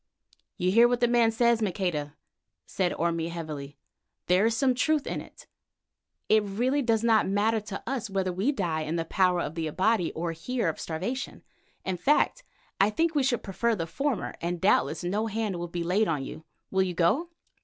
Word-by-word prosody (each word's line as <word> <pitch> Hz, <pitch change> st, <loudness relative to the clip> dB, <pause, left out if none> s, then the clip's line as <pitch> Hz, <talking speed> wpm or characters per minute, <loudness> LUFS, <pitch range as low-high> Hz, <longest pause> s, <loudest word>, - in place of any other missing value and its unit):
"You 180 Hz, -2 st, +1 dB
hear 230 Hz, +4 st, +7 dB
what 245 Hz, 0 st, 0 dB
the 240 Hz, -, +3 dB
man 235 Hz, -1 st, +4 dB
says, 235 Hz, 0 st, +2 dB
Maqueda?" 175 Hz, -7 st, -2 dB, 0.5 s
said 180 Hz, -2 st, -1 dB
Orme 165 Hz, 0 st, -1 dB
heavily. 150 Hz, -4 st, -6 dB, 0.5 s
"There 185 Hz, +5 st, +4 dB
is 230 Hz, 0 st, 0 dB
some 260 Hz, +1 st, +3 dB
truth 295 Hz, +4 st, +1 dB
in -, -, -3 dB
it. -, -, -14 dB, 0.8 s
It 215 Hz, 0 st, +5 dB
really 240 Hz, +8 st, 0 dB
does 230 Hz, -3 st, +1 dB
not 225 Hz, -4 st, +3 dB
matter 215 Hz, +3 st, +2 dB
to 205 Hz, -1 st, -7 dB
us 250 Hz, -4 st, -3 dB
whether 190 Hz, -2 st, -1 dB
we 200 Hz, +10 st, +1 dB
die 170 Hz, -, -1 dB
in 155 Hz, +2 st, -3 dB
the 165 Hz, -1 st, -1 dB
power 180 Hz, 0 st, +2 dB
of 155 Hz, -, -4 dB
the 165 Hz, -1 st, -3 dB
Abati 185 Hz, +3 st, +1 dB
or 170 Hz, +1 st, -2 dB
here 185 Hz, +5 st, -2 dB
of 160 Hz, -, -5 dB
starvation; 195 Hz, +12 st, -4 dB, 0.4 s
in 190 Hz, -1 st, -1 dB
fact, 295 Hz, -, +2 dB, 0.4 s
I 195 Hz, -, +5 dB
think 325 Hz, +10 st, +1 dB
that 310 Hz, -, -2 dB
we -, -, +4 dB
should 255 Hz, -3 st, 0 dB
prefer 225 Hz, +4 st, 0 dB
the 165 Hz, -5 st, -3 dB
former 275 Hz, -, -2 dB
end, 175 Hz, +1 st, -1 dB
and -, -, -11 dB
doubtless 190 Hz, -, +2 dB
no 205 Hz, +5 st, -1 dB
hand 215 Hz, -3 st, -2 dB
will 175 Hz, 0 st, -4 dB
be 170 Hz, 0 st, -4 dB
laid 195 Hz, +6 st, +2 dB
on 150 Hz, -4 st, -1 dB
you. 160 Hz, -, -9 dB, 0.3 s
Will 190 Hz, -, +2 dB
you 185 Hz, -2 st, -1 dB
go?" 225 Hz, -, +2 dB
195 Hz, 200 wpm, -27 LUFS, 170-235 Hz, 0.8 s, hear